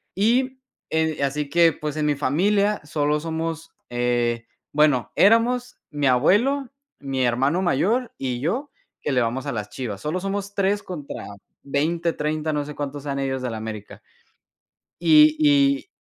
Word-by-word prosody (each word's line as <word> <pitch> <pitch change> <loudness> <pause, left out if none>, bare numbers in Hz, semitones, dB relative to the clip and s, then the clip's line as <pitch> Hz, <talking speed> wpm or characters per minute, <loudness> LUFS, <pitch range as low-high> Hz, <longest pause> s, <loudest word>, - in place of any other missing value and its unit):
Y 255 +6 +1 0.3
eh 160 -2 0
así 145 +1 -1
que, 170 0 +4
pues, 150 +1 -5
en 150 - 0
mi 145 -1 +2
familia 200 +9 +1
solo 150 0 0
somos 165 0 -4 0.2
eh, 120 -1 0 0.3
bueno, 145 -6 +2
éramos 245 +4 +3
mi 145 -2 0
abuelo, 230 - +3 0.3
mi 135 -2 -2
hermano 135 +8 +1
mayor, 205 - +1
y 125 -2 -3
yo, 240 - -2 0.3
que - - -2
le 125 -2 +2
vamos 120 +3 -2
a - - -2
las 105 -2 -4
Chivas. 105 -7 -5
Solo 160 +5 -2
somos 200 +1 -4
3 200 +1 +1
contra 155 -6 -7 0.4
20, 165 +4 0
30, 155 +1 -2
no 145 -1 -1
sé 150 - -7
cuántos 145 -1 -5
sean 140 -1 -3
ellos 130 -1 -2
del 125 - -3
América. 110 -1 -7 1.0
Y 310 0 +6
y 285 +1 +3
150 Hz, 155 wpm, -23 LUFS, 135-200 Hz, 1.0 s, Y